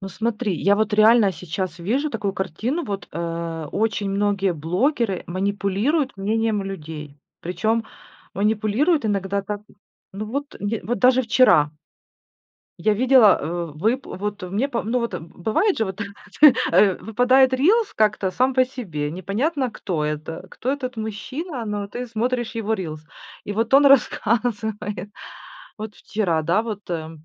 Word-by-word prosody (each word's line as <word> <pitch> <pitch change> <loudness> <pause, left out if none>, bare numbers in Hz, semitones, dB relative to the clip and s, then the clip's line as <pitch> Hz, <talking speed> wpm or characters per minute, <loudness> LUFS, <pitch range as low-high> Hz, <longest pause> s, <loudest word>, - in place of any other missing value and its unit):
Ну, 195 - -6
смотри, 220 +1 -2
я 200 +1 +4
вот 215 0 0
реально 215 -1 +6
сейчас 180 +2 -5
вижу 255 - -1
такую 200 -7 -2
картину, 215 - -2
вот, 200 -2 -5
э, 165 -1 -4
очень 210 -2 0
многие 200 -1 +1
блогеры 190 - 0
манипулируют 200 - 0
мнением 215 +1 0
людей, 155 -6 -7 0.2
причем 215 +7 -1 0.5
манипулируют 220 - +1
иногда 200 -1 -1
так 205 0 -5 0.5
ну 210 +2 -4
вот 280 +6 -4
нет 205 +2 -2
вот 240 +1 -1
даже 255 +4 +4
вчера 200 - +4 1.1
я 215 - +2
видела, 245 -3 +6
э, 170 +2 -3
вып 225 - 0
вот, 205 +1 -5
мне 205 +10 -1
пом 235 -4 -3
ну 250 - +2
вот, 235 -5 -3
бывает 215 - -1
же 220 - +1
вот, 190 0 -6 0.7
э, 195 -3 +5
выпадает 255 +4 +3
рилс 395 - +3
как-то 215 -3 +1
сам 255 +7 +1
по 255 0 +5
себе, 180 - -5
непонятно, 245 - -1
кто 170 -8 -3
это, 155 +4 -4
кто 260 - -2
этот 260 -3 -4
мужчина. 235 - -5
Но 205 -1 -3
ты 245 +5 -6
смотришь 240 +1 -2
его 225 -1 -2
рилс, 155 -6 -6 0.4
и 205 - -4
вот 225 +4 0
он 280 +1 +7
рассказывает 220 -6 +1 0.7
вот 215 -1 -7
вчера, 180 -7 -1
да, 170 +7 +2
вот, 215 -4 -6
а, 160 -2 -3
210 Hz, 145 wpm, -22 LUFS, 185-245 Hz, 1.1 s, он